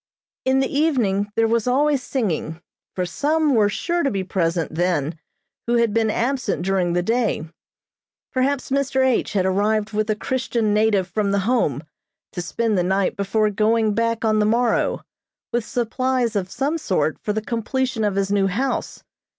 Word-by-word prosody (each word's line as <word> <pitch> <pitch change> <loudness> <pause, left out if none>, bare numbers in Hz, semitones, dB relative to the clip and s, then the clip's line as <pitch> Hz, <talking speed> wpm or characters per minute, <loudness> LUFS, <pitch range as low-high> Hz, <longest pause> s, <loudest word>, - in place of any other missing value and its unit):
In 265 +1 +3
the 270 - -2
evening 220 -10 +1
there 225 0 +3
was 230 +1 0
always 280 +2 +2
singing, 175 - -2 0.4
for 180 - -1
some 295 - +1
were 210 -4 +4
sure 345 +11 -1
to 280 - +1
be 195 -4 -2
present 170 -3 -1
then, 160 -2 -1 0.5
who 240 - +2
had 235 -3 +2
been 225 -1 +2
absent 240 -5 -1
during 185 -3 +1
the 175 0 +1
day. 225 -6 0 0.9
Perhaps 265 +1 0
Mr. 270 -1 +1
H. 255 -5 +1
had 190 -3 +1
arrived 210 +3 +1
with 215 +1 -1
a 215 - +2
Christian 235 -2 -1
native 210 -3 +2
from 200 +2 -1
the 200 -1 0
Home, 165 - +1 0.5
to 175 - -4
spend 215 +3 0
the - - +2
night 190 +1 +1
before 210 +2 +1
going 215 +1 +2
back 230 +1 0
on 215 -1 +2
the 210 - +3
morrow, 235 +1 +1 0.5
with 240 -1 +1
supplies 250 -1 -1
of 190 -2 -1
some 290 +9 -1
sort 185 - 0
for 210 - -2
the 215 - -1
completion 235 +2 -2
of 205 -2 0
his 195 0 0
new 200 -1 +2
house. 245 +9 -2
220 Hz, 175 wpm, -22 LUFS, 195-250 Hz, 0.9 s, were